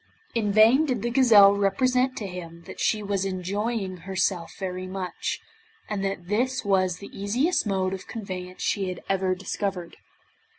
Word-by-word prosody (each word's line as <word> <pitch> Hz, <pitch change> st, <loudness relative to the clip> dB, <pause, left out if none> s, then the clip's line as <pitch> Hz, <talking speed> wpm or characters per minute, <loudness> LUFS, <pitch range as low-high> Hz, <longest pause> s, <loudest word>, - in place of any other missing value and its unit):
In 215 Hz, -3 st, 0 dB
vain 230 Hz, +9 st, +6 dB
did 250 Hz, -6 st, -1 dB
the 240 Hz, -, -1 dB
gazelle 220 Hz, -6 st, +7 dB
represent 255 Hz, +6 st, +1 dB
to 210 Hz, -, -4 dB
him 170 Hz, -3 st, -8 dB
that -, -, -10 dB
she 215 Hz, -1 st, +1 dB
was 200 Hz, -1 st, -1 dB
enjoying 195 Hz, +1 st, -2 dB
herself 180 Hz, -1 st, -2 dB
very 185 Hz, -1 st, -4 dB
much, 185 Hz, -1 st, -3 dB, 0.5 s
and 205 Hz, -2 st, -3 dB
that 195 Hz, -3 st, -3 dB
this 240 Hz, +4 st, 0 dB
was 185 Hz, -3 st, +2 dB
the 200 Hz, -, -11 dB
easiest 235 Hz, -, +1 dB
mode 190 Hz, -1 st, 0 dB
of 190 Hz, -, -7 dB
conveyance 185 Hz, -5 st, -6 dB
she 195 Hz, -2 st, 0 dB
had 180 Hz, -, -6 dB
ever 190 Hz, -1 st, +1 dB
discovered. 190 Hz, -2 st, -4 dB
195 Hz, 160 wpm, -26 LUFS, 185-215 Hz, 0.5 s, gazelle